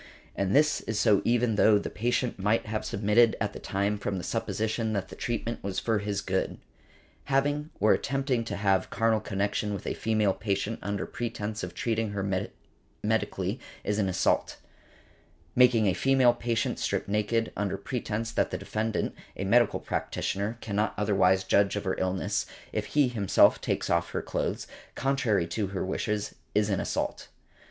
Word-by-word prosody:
And 100 +2 0
this 150 +1 +4
is 110 -1 -1
so 105 -4 +4
even 120 -2 +2
though 105 0 +6
the 100 - -4
patient 120 0 -1
might 105 +4 +1
have 110 0 -3
submitted 105 +3 +3
at 105 -1 -1
the - - -7
time 100 +1 -1
from 100 -1 -2
the 90 - -5
supposition 110 +4 -1
that 100 -2 -2
the - - -9
treatment 115 0 -3
was 100 -1 -3
for 110 -2 +1
his 100 -1 -2
good. 95 -1 -1 0.7
Having 145 +2 +1
or 105 +2 +5
attempting 135 -2 0
to 100 - -3
have 100 -2 +1
carnal 115 -1 +2
connection 100 0 -1
with - - -7
a - - -1
female 110 -3 +1
patient 105 +2 -2
under 100 0 -2
pretence 110 -2 -4
of - - -6
treating 110 -2 -1
her 100 -1 -2 0.8
medically - - -1 0.2
is 105 +1 0
an 100 -2 +1
assault. 95 +1 +1 1.0
Making 125 -3 +5
a 95 - +3
female 130 +1 +4
patient 115 -2 -1
strip - - -1
naked, 105 +3 0
under 100 -1 -1
pretence 115 0 -3
that - - +1
the - - -3
defendant, 110 0 -2 0.2
a - - -2
medical 120 +2 +4
practitioner, 100 +4 -2
cannot 105 0 -1
otherwise 95 -2 +3
judge 100 +1 +3
of 105 - -2
her 95 -2 -1
illness, 95 0 -1 0.3
if - - -1
he 145 -3 +3
himself 110 -6 +4
takes - - -1
off 85 0 +1
her - - -2
clothes, - - -2 0.3
contrary 125 -9 +1
to 100 +5 -2
her 95 -1 -3
wishes, 105 +2 -2 0.2
is 105 0 +2
an 95 - +1
assault. - - -2
105 Hz, 170 wpm, -28 LUFS, 100-115 Hz, 1.0 s, though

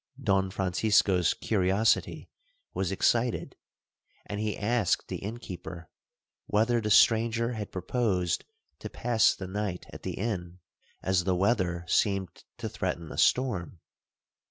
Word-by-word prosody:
Don 95 -6 +1
Francisco's 95 -1 +2
curiosity 100 +1 +1 0.5
was 95 -1 -1
excited, 115 +5 +1 0.7
and 105 - -5
he 105 -1 -2
asked 110 -2 0
the - - -3
innkeeper, 90 -6 -8 0.6
whether 115 +3 +2
the 105 - -2
stranger 115 +2 +4
had 105 -3 -5
proposed 95 -2 -1 0.4
to - - -6
pass 115 -3 +2
the 95 - -7
night 95 -1 -4
at - - -9
the - - -4
inn, 90 -5 -4 0.5
as 95 -2 +1
the 95 -1 +2
weather 90 -3 +1
seemed 95 -4 0
to - - -4
threaten 85 -2 -4
a - - -8
storm? 100 -9 +1
100 Hz, 125 wpm, -28 LUFS, 90-110 Hz, 0.7 s, stranger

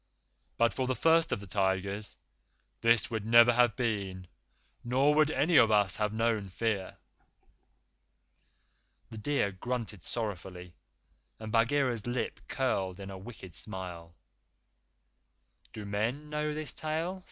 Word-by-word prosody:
But 115 0 +3
for 130 -1 -2
the 130 - 0
First 165 +5 +3
of - - 0
the - - -8
Tigers, 100 +2 -1 0.6
this 115 -2 +3
would 110 -2 -2
never 115 +2 +7
have 120 -1 +3
been, 100 -7 -2 0.6
nor 130 +4 +3
would 155 0 +4
any 155 +1 +3
of 115 - +7
us 105 -4 +3
have 105 -1 0
known 110 -2 0
fear." 100 0 -2 2.1
The 110 - -7
deer 135 -4 0
grunted 110 0 -4
sorrowfully 90 -4 -5 0.7
and 110 -1 -6
Bagheera's 120 -1 +1
lips 120 +1 -3
curled 95 -8 -1
in 100 0 -7
a 95 - -7
wicked 95 -4 -10
smile. 90 -5 -7 1.6
"Do 105 - -8
men 115 +9 -2
know 150 0 -1
this 155 0 -4
tale?" 160 +4 -3
115 Hz, 130 wpm, -30 LUFS, 100-130 Hz, 2.1 s, never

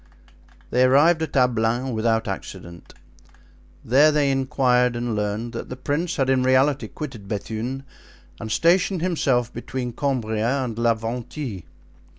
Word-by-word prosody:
They 125 - +2
arrived 145 +6 +5
at 160 - -4
Ablain 125 0 +1
without 110 0 0
accident. 95 -3 -8 0.9
There 145 +6 +5
they 145 -2 +2
inquired 125 -2 +2
and 120 -1 -2
learned 105 +3 -3
that 115 - -6
the 125 - -5
prince 150 +7 -2
had 135 -3 0
in 130 -1 +3
reality 130 +2 +2
quitted 125 -10 -8
Bethune 110 +6 -4 0.6
and 110 -2 -6
stationed 175 - +2
himself 130 -9 0
between 125 +1 -5
Cambria 125 -1 -1
and 120 -3 -4
La 115 -1 +3
Venthie. 115 - -5
125 Hz, 135 wpm, -23 LUFS, 115-135 Hz, 0.9 s, arrived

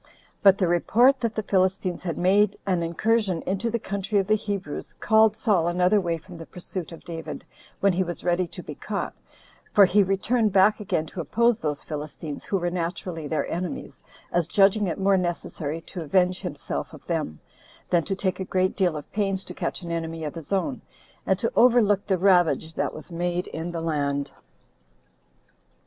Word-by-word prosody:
But 195 -1 +7
the 185 - +1
report 240 +10 +4
that 230 -3 -2
the 215 - -1
Philistines 185 -2 +1
had 175 -3 -2
again - - -4
made 200 +2 +4
an 185 -3 +1
incursion 185 +1 0
into 200 +5 -1
the 235 - 0
country 200 -1 -2
of 195 - +2
the 215 - +2
Hebrews, 200 -7 -4
called 220 -1 +4
Saul 190 -8 +2
another 180 +4 +3
way 170 -2 -1
from 175 +2 -12
the 165 - -9
pursuit 180 -1 -6
of 165 - -11
David, 165 -2 -7 0.4
when 200 -1 +4
he 180 - +1
was 175 -2 -3
ready 175 0 +1
to - - -9
be - - -7
caught; - - -4 0.6
for 200 - +7
he 200 +3 +4
returned 205 +4 +1
back 195 +2 +4
again 175 -6 -1
to 170 +3 -6
oppose 235 +8 +2
those 150 -2 -3
Philistines, 150 0 -6
who 195 - 0
were 175 -1 -1
naturally 170 -2 -3
their 155 - -1
enemies, 175 0 -5 0.3
as 175 -2 +1
judging 200 +2 +4
it 170 - -2
more 195 0 +3
necessary 165 -3 -3
to 175 +2 -7
avenge 180 +3 +2
himself 175 -7 -5
of - - -16
them, 75 0 -2 0.5
than 170 -2 +3
to 195 - -2
take 190 -1 -1
a - - -1
great 185 0 0
deal 180 -5 +1
of 150 - -9
pains 195 -2 -1
to - - -7
catch - - -3
an 170 - -5
enemy 165 -1 -3
of 150 - -4
his 165 0 -9
own, 200 +8 -1 0.5
and - - +3
to - - -1
overlook 220 -5 +4
the 190 - +2
ravage 175 -3 +3
that - - -1
was 155 - -10
made 175 +1 -1
in 165 +2 -5
the 170 -1 -4
land. 145 -3 -1
185 Hz, 195 wpm, -25 LUFS, 165-200 Hz, 0.6 s, But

